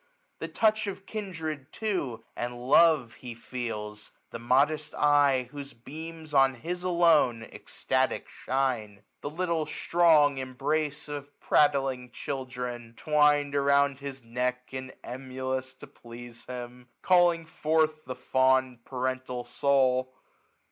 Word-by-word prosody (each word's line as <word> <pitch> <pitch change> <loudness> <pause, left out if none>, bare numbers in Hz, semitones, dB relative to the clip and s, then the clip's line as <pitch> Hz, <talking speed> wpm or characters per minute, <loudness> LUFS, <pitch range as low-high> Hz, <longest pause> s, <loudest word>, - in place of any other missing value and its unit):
yhe: - - -5
touch 220 -1 +2
of 195 0 -6
kindred 160 -9 -5
too 180 - -3
and 120 0 -4
love 155 -6 +5
he 120 -2 -8
feels; 110 -4 -6 0.2
The 115 - -6
modest 145 +6 +1
eye, 145 -4 +3
whose 140 -1 -8
beams 155 +5 -9
on 135 -1 +5
his 175 +8 -5
alone 165 -10 +3
Extatic - - -2
shine; 120 -7 -2 0.2
the 145 - -4
little 165 -1 -1
strong 155 -5 +3
embrace 150 +4 -2
Of 145 -1 -8
prattling 135 -4 +2
children, 125 -3 -6
twin'd 150 -1 +3
around 140 -1 +3
his 135 -2 -7
neck, 125 +2 -2
1 130 0 -5
340 - - -17
And 125 +1 -6
emulous 130 0 -4
to - - -12
please 120 0 -12
him, 125 0 -8 0.2
calling 175 -2 +4
forth 155 -1 0
The 130 0 -5
fond 130 -1 +1
parental 130 -1 -3
soul. 130 -2 +1
135 Hz, 125 wpm, -28 LUFS, 125-155 Hz, 0.2 s, love